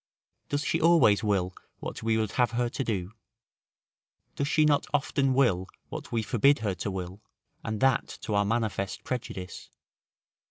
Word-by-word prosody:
Does 145 Hz, +1 st, -1 dB
she -, -, 0 dB
always 155 Hz, -12 st, +5 dB
will 95 Hz, -3 st, +1 dB, 0.2 s
what -, -, -6 dB
we 110 Hz, 0 st, +1 dB
would 110 Hz, -2 st, -1 dB
have 120 Hz, -2 st, +1 dB
her 120 Hz, 0 st, +1 dB
to 135 Hz, -, -3 dB
do? 100 Hz, -5 st, -3 dB, 1.2 s
Does 140 Hz, -, -1 dB
she 155 Hz, +1 st, +3 dB
not 145 Hz, -1 st, +2 dB
often 135 Hz, -1 st, +1 dB
will 100 Hz, -9 st, +2 dB, 0.2 s
what -, -, -7 dB
we 115 Hz, -1 st, 0 dB
forbid 140 Hz, +6 st, +4 dB
her 100 Hz, -, +1 dB
to 95 Hz, -, -4 dB
will, 95 Hz, +1 st, -6 dB, 0.4 s
and 110 Hz, -1 st, -3 dB
that 135 Hz, -2 st, +3 dB
to 105 Hz, -, -3 dB
our 100 Hz, 0 st, +3 dB
manifest 105 Hz, -3 st, -2 dB
prejudice? 95 Hz, -7 st, -5 dB
115 Hz, 160 wpm, -28 LUFS, 100-135 Hz, 1.2 s, always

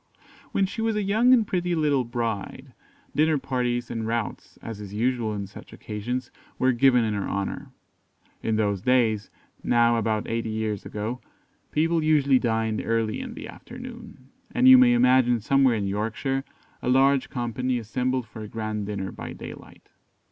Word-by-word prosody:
When 195 Hz, -, +2 dB
she 210 Hz, +4 st, -5 dB
was 225 Hz, -1 st, 0 dB
a 210 Hz, -, 0 dB
young 220 Hz, +6 st, +3 dB
and 240 Hz, -4 st, +5 dB
pretty 180 Hz, -2 st, -1 dB
little 145 Hz, -4 st, +2 dB
bride, 115 Hz, -4 st, -4 dB, 0.4 s
dinner 155 Hz, 0 st, +3 dB
parties 125 Hz, -3 st, -2 dB
and 115 Hz, -2 st, -3 dB
routs, 115 Hz, -1 st, -4 dB
as 110 Hz, -2 st, -7 dB
is 100 Hz, 0 st, -8 dB
usual 120 Hz, 0 st, 0 dB
on 100 Hz, -1 st, -4 dB
such 95 Hz, -, -13 dB
occasions, 120 Hz, +4 st, -4 dB, 0.3 s
were 130 Hz, -, +3 dB
given 125 Hz, 0 st, +4 dB
in 110 Hz, -1 st, 0 dB
her 100 Hz, -1 st, -2 dB
honour. 100 Hz, 0 st, -3 dB, 0.7 s
In 110 Hz, -, 0 dB
those 100 Hz, -3 st, 0 dB
days, 115 Hz, -4 st, +2 dB, 0.3 s
now 120 Hz, 0 st, +3 dB
about 110 Hz, -1 st, -1 dB
eighty 115 Hz, 0 st, -2 dB
years 110 Hz, -2 st, -3 dB
ago, 110 Hz, +4 st, -4 dB, 0.5 s
people 165 Hz, +1 st, +1 dB
usually 140 Hz, -4 st, +4 dB
dined 110 Hz, -2 st, 0 dB
early 115 Hz, -1 st, 0 dB
in 250 Hz, -3 st, -7 dB
the -, -, -7 dB
afternoon, 235 Hz, -, -11 dB, 0.2 s
and 255 Hz, -, +3 dB
you 260 Hz, -, +11 dB
may 250 Hz, -1 st, +6 dB
imagine 125 Hz, -, +4 dB
somewhere 135 Hz, +2 st, +3 dB
in 105 Hz, -2 st, -1 dB
Yorkshire, 115 Hz, +7 st, -2 dB, 0.4 s
a -, -, -2 dB
large 135 Hz, +1 st, +3 dB
company 125 Hz, +1 st, -2 dB
assembled 125 Hz, +2 st, -1 dB
for 110 Hz, +1 st, -10 dB
a 105 Hz, -, -6 dB
grand 110 Hz, -2 st, -4 dB
dinner 95 Hz, -2 st, -4 dB
by -, -, -7 dB
daylight. -, -, -11 dB
120 Hz, 165 wpm, -25 LUFS, 110-140 Hz, 0.7 s, you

